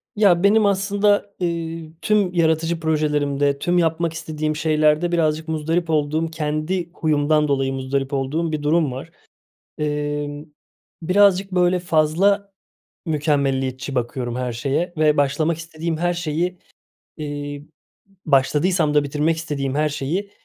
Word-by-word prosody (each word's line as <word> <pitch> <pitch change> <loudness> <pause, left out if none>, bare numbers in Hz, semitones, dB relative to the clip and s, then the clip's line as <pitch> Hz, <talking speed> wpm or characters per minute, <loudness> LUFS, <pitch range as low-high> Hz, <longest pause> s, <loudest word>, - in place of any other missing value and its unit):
Ya, 195 -4 +4
benim 215 +2 +5
aslında, 200 +1 +1
eee, 165 -2 -3
tüm 205 -4 +2
yaratıcı 165 0 +1
projelerimde, 145 -3 0
tüm 175 +4 +1
yapmak 165 0 +1
istediğim 155 -1 -3
şeylerde 155 +2 +2
birazcık 160 -2 0
muzdarip 160 +2 -1
olduğum, 155 +1 +1
kendi 160 +3 -2
huyumdan 150 -1 +1
dolayı 135 -1 0
muzdarip 135 +1 -2
olduğum 145 +5 -1
bir 150 -1 -3
durum 155 -1 +2
var. 135 +6 -8 0.7
Emm, 145 -1 -3 0.6
birazcık, 195 +2 +3
böyle, 180 0 +3
fazla 180 +5 +2 0.5
mükemmeliyetçi 140 -4 -1
bakıyorum 120 0 -2
her 125 -1 -2
şeye 140 +9 -1
ve 155 -1 +3
başlamak 150 +3 +1
istediğim 165 0 -4
her 175 +2 0
şeyi, 175 +1 -2 0.6
eee, 145 -1 -5 0.6
başladıysam 150 +3 +2
da 150 -1 +4
bitirmek 150 +3 0
istediğim 140 -4 -3
her 150 +1 +1
şeyi, 165 +8 -3
155 Hz, 125 wpm, -21 LUFS, 145-170 Hz, 0.7 s, benim